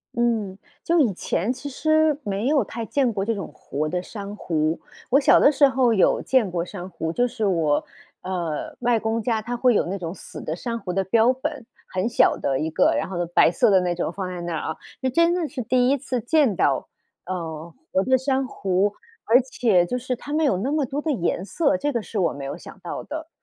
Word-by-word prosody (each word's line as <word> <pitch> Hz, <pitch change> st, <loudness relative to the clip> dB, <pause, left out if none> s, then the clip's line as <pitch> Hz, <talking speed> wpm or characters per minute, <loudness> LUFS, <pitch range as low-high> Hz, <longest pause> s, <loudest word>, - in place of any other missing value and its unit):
嗯， 225 Hz, -5 st, 0 dB, 0.3 s
就 340 Hz, 0 st, +2 dB
以 240 Hz, -10 st, +3 dB
前 190 Hz, +5 st, -1 dB
其 275 Hz, +3 st, -7 dB
实 310 Hz, +1 st, +2 dB
没 205 Hz, +2 st, -2 dB
有 280 Hz, -5 st, +3 dB
太 230 Hz, +2 st, -5 dB
见 255 Hz, -1 st, +1 dB
过 195 Hz, -2 st, -1 dB
这 230 Hz, +3 st, 0 dB
种 200 Hz, -4 st, -5 dB
活 150 Hz, +2 st, -4 dB
的 180 Hz, +3 st, -2 dB
珊 200 Hz, +1 st, -7 dB
瑚。 160 Hz, -4 st, -1 dB, 0.3 s
我 265 Hz, -, +5 dB
小 285 Hz, 0 st, +6 dB
的 -, -, +6 dB
时 285 Hz, -1 st, +5 dB
候 260 Hz, -3 st, +3 dB
有 195 Hz, -, +3 dB
见 245 Hz, -8 st, +2 dB
过 170 Hz, -1 st, -1 dB
珊 180 Hz, -1 st, -8 dB
瑚， 165 Hz, -2 st, -4 dB
就 245 Hz, -, +2 dB
是 225 Hz, -3 st, -2 dB
我， 165 Hz, -6 st, +1 dB, 0.4 s
呃， 175 Hz, -5 st, -4 dB
外 240 Hz, -1 st, +2 dB
公 225 Hz, +1 st, -1 dB
家 225 Hz, -2 st, 0 dB
他 240 Hz, +3 st, -4 dB
会 245 Hz, 0 st, +3 dB
有 -, -, +2 dB
那 190 Hz, +3 st, -3 dB
种 170 Hz, -3 st, -5 dB
死 190 Hz, -, -10 dB
的 155 Hz, -, -3 dB
珊 230 Hz, +7 st, -4 dB
瑚 200 Hz, -5 st, -5 dB
的 195 Hz, +2 st, +1 dB
标 225 Hz, +5 st, +4 dB
本， 255 Hz, -2 st, -4 dB, 0.2 s
很 185 Hz, +5 st, -1 dB
小 235 Hz, -, +4 dB
的 135 Hz, -1 st, -1 dB
一 160 Hz, -, -1 dB
个， 160 Hz, -, +3 dB
然 -, -, -1 dB
后 175 Hz, -2 st, -2 dB
白 175 Hz, -, +5 dB
色 215 Hz, +6 st, +3 dB
的 190 Hz, -, +6 dB
那 180 Hz, -1 st, -1 dB
种 170 Hz, -, -2 dB
放 190 Hz, +1 st, -4 dB
在 180 Hz, -1 st, -5 dB
那 170 Hz, 0 st, -4 dB
儿 -, -, -2 dB
啊。 -, -, -19 dB, 0.3 s
就 260 Hz, -, +1 dB
真 335 Hz, +6 st, +3 dB
的 350 Hz, -3 st, -1 dB
是 285 Hz, -3 st, -5 dB
第 250 Hz, +2 st, +2 dB
一 280 Hz, -, +3 dB
次 255 Hz, -1 st, -3 dB
见 245 Hz, -, +2 dB
到， 135 Hz, -2 st, +1 dB, 0.4 s
呃， 165 Hz, -2 st, -5 dB, 0.2 s
活 190 Hz, -, +3 dB
的 260 Hz, +3 st, +3 dB
珊 265 Hz, +1 st, 0 dB
瑚， 195 Hz, -3 st, 0 dB, 0.3 s
而 245 Hz, +4 st, +5 dB
且 230 Hz, -8 st, +2 dB
就 250 Hz, -, -2 dB
是 250 Hz, 0 st, -3 dB
它 290 Hz, -, -7 dB
们 315 Hz, +1 st, +2 dB
有 270 Hz, -11 st, +2 dB
那 255 Hz, +10 st, -1 dB
么 305 Hz, -3 st, +1 dB
多 275 Hz, +4 st, -3 dB
的 315 Hz, -, -3 dB
颜 180 Hz, -4 st, -1 dB
色， 280 Hz, -, +1 dB
这 290 Hz, +1 st, -1 dB
个 235 Hz, -, 0 dB
是 210 Hz, -, -4 dB
我 175 Hz, -, +1 dB
没 140 Hz, -, -7 dB
有 135 Hz, -, -5 dB
想 -, -, -12 dB
到 -, -, -5 dB
的。 315 Hz, +1 st, -7 dB
225 Hz, 255 characters per minute, -23 LUFS, 180-260 Hz, 0.4 s, 小